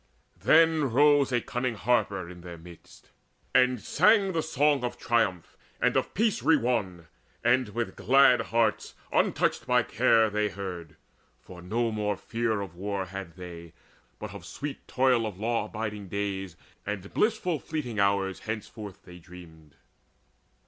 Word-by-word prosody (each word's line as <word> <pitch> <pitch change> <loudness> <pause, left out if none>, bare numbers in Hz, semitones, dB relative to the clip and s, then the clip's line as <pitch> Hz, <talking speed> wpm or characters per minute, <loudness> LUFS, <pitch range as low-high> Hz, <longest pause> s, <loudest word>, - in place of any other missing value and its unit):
Then 160 -3 +4
rose 145 +1 +4
a 120 -1 +1
cunning 125 0 -3
harper 100 -5 0
in 90 0 -11
their 85 -1 -9
midst. 85 +1 -16 0.4
And 125 -1 +4
sang 195 - +3
the 165 -2 0
song 145 -3 +1
of 120 0 -3
triumph 115 -8 0 0.2
and - - +2
of - - -1
peace 215 - +1
Re 155 +5 +4
won, 100 - -2 0.4
and 120 0 +3
with 115 +2 -4
glad 130 -1 +5
hearts 115 -2 0 0.2
untouched - - +1
by - - +3
care 110 -1 +3
They 105 0 0
heard; 90 -6 -7 0.4
for 90 +7 -13
no 115 +6 -1
more 105 -2 -1
fear 115 -2 -2
of 95 -4 -7
war 100 +1 -3
had 95 -2 -8
they, 85 -3 -10 0.4
But - - -7
of - - -9
sweet 145 0 -7
toil 125 -3 +2
of 100 -4 -7
law 115 0 0
abiding 105 -2 -5
days 95 -2 -4 0.3
And 100 -1 -6
blissful, 180 -7 +1
fleeting 125 -8 -4
hours 100 -1 +1
henceforth 110 -2 -7
they 90 -1 -13
dreamed. 80 -4 -15
110 Hz, 150 wpm, -27 LUFS, 95-125 Hz, 0.4 s, glad